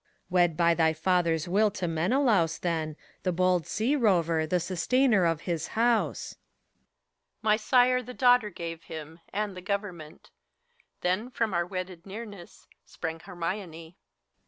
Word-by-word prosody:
PHORKYAS. - - -38
Wed 175 -3 +3
by 170 -1 +4
thy 160 -1 +2
father's 165 -1 +1
will 210 +4 +3
to 185 -2 -4
Menelaus 175 - +2
then, 160 -3 -2 0.3
The 185 - 0
bold 180 -2 +1
sea 235 +7 0
rover, 170 - +2
the 180 +3 +1
sustainer 200 +4 +2
of 165 -2 +1
his 170 -3 -3
house. 235 0 +1
HELENA. - - -39
My 215 -1 +4
sire 250 +3 +3
the 250 +1 -10
daughter 245 -4 +4
gave 165 -3 -7
him, 160 +1 -8
and 205 -1 -2
the 185 - -8
government: 180 -5 -5 0.7
Then 185 +7 0
from 230 -5 -1
our 175 0 0
wedded 185 -1 -6
nearness 200 -3 -9 0.2
sprang 160 0 -6
Hermione. 170 -2 -6
180 Hz, 145 wpm, -28 LUFS, 165-215 Hz, 0.7 s, by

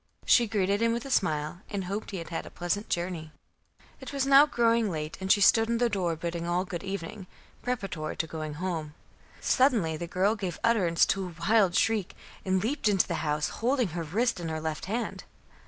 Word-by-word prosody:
She 240 -2 +5
greeted 200 -1 0
him 230 0 +3
with 235 +2 -3
a 275 - -6
smile, 155 -5 0
and 200 -2 -3
hoped 200 +4 -4
he 195 - -5
had 165 - -7
had 165 - -4
a - - -8
pleasant 180 +4 -3
journey. 170 -3 -3 0.7
It 265 - -8
was 275 -2 0
now 275 +2 +7
growing 230 -4 +2
late, 155 -2 -4
and 190 0 0
she 205 - +5
stood 225 +2 +5
in 235 - +1
the 240 0 +2
door 180 -5 0
bidding 170 +1 -4
all 175 +2 0
good 180 -1 -6
evening, 195 0 -6 0.3
preparatory 195 -11 -3
to - - 0
going 155 -2 -5
home. 160 -3 -4 0.5
Suddenly 225 - +2
the 170 - -5
girl 190 +5 +1
gave 190 -5 -4
utterance 185 -8 +3
to 195 -1 -1
a 175 - -10
wild 200 -5 +4
shriek 220 -5 +1 0.3
and 190 0 +1
leaped 235 -1 0
into 195 -3 +3
the - - -2
house, 150 -1 0
holding 250 -2 +2
her 170 +1 -4
wrist 195 +7 0
in 170 -2 -4
her 160 0 -3
left 155 0 -4
hand. 225 +4 -3
190 Hz, 205 wpm, -28 LUFS, 165-225 Hz, 0.7 s, now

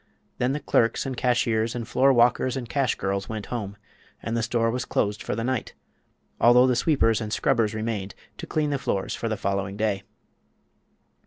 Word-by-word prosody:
Then 125 +2 +1
the 150 - -2
clerks 115 -4 +1
and 135 -1 -3
cashiers 115 -2 +1
and 120 -2 -4
floorwalkers 130 0 +3
and 125 -3 -5
cash 135 +1 0
girls 95 0 -3
went 110 -2 -4
home 100 -4 -4 0.4
and 115 - -4
the 115 - 0
store 115 0 +1
was 125 +1 -2
closed 105 -3 -1
for - - -3
the 115 - -3
night, 130 -1 -2 0.6
although 120 +2 +6
the 130 -1 +2
sweepers 120 -7 +2
and 105 -1 -4
scrubbers 115 -2 +1
remained 110 -3 -3 0.2
to - - -6
clean 150 -1 0
the 140 - -1
floors 95 -5 -2
for 115 - -3
the 110 - -2
following 100 0 -2
day. 105 -2 0
115 Hz, 180 wpm, -25 LUFS, 105-125 Hz, 0.6 s, although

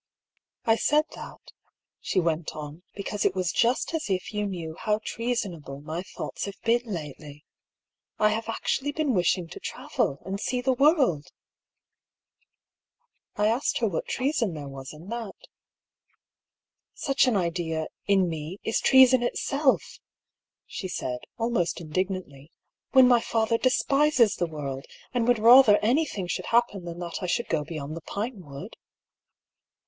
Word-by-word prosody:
" - - -48
I - - 0
said 300 +5 +3
that," - - -11 0.5
she - - 0
went 165 -2 -1
on, 150 +2 -8
" - - -39
because 200 +1 -3
it 190 - +2
was 180 -2 0
just 240 - +1
as 320 -9 -2
if 185 +2 -2
you 210 0 -1
knew 170 -5 -5
how 210 -1 0
treasonable 195 - -3
my 155 +4 -5
thoughts 190 - -6
have 200 -1 -8
been 235 +1 +3
lately. 150 - -7 0.7
I 210 - +4
have 225 +1 -2
actually 270 +5 -1
been 300 -4 0
wishing 180 -2 +1
to - - -9
travel, 135 - -2
and 195 +1 -3
see 250 +3 -1
the 260 +1 +1
world! 270 - +3 0.9
" - - -51
I 210 - +2
asked 230 +6 +1
her - - +1
what - - -3
treason 255 - 0
there 145 -2 -6
was 135 -1 -8
in 155 +4 -12
that. 230 -4 -5 0.9
" - - -67 0.7
Such 275 -2 +2
an 235 -5 +3
idea, 170 -3 -1 0.2
in 195 -2 +4
me, 160 +2 -5
is 225 - 0
treason 260 -1 +6
itself! 275 +3 0 0.3
" - - -65 0.3
she 190 - -6
said, 125 -8 -3 0.2
al 230 +1 0
most 175 -8 0
indignantly 165 -3 -4
— - - -55
" - - -64
when 260 -1 +8
my 245 -2 +5
father 230 0 +1
despises 265 -2 +3
the 175 - 0
world, 140 -4 -6 0.3
and 240 -2 +1
would 245 -1 +4
rather 230 -1 +8
anything 240 - +1
should 175 - -3
happen 230 -6 +1
than 170 0 -6
that 175 +1 -5
I 180 - -2
should 235 +7 -1
go 155 -2 0
beyond 155 -1 -6
the 165 - -7
Pinewood." 190 - -6
200 Hz, 165 wpm, -26 LUFS, 165-245 Hz, 0.9 s, when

